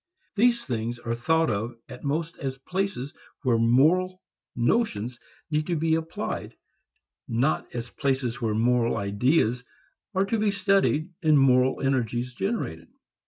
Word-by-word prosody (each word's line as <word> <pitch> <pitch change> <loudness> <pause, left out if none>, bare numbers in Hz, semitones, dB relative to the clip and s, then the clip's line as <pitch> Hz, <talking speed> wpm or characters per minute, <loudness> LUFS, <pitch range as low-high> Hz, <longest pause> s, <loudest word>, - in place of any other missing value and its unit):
These 235 +2 +3
things 120 -1 -2
are 115 -1 -3
thought 160 +5 +2
of 110 +4 -3
at 125 - -10
most 160 +3 -2
as 135 -1 -3
places 180 -2 -3 0.3
where 120 -4 +3
moral 160 +11 +3 0.4
notions 120 - 0 0.3
need 150 0 0
to 175 - 0
be 160 +1 +1
applied, 160 0 -3 0.7
not 125 +7 0
as 120 0 -4
places 130 -4 -1
where 110 -2 0
moral 120 +1 +2
ideas 120 +4 +1 0.5
are 190 +1 +3
to 220 +2 -1
be 215 0 +2
studied 195 -4 +2
and 155 -3 +5
moral 130 -1 +4
energies 125 -2 0
generated. 120 - -3
135 Hz, 135 wpm, -26 LUFS, 120-165 Hz, 0.7 s, and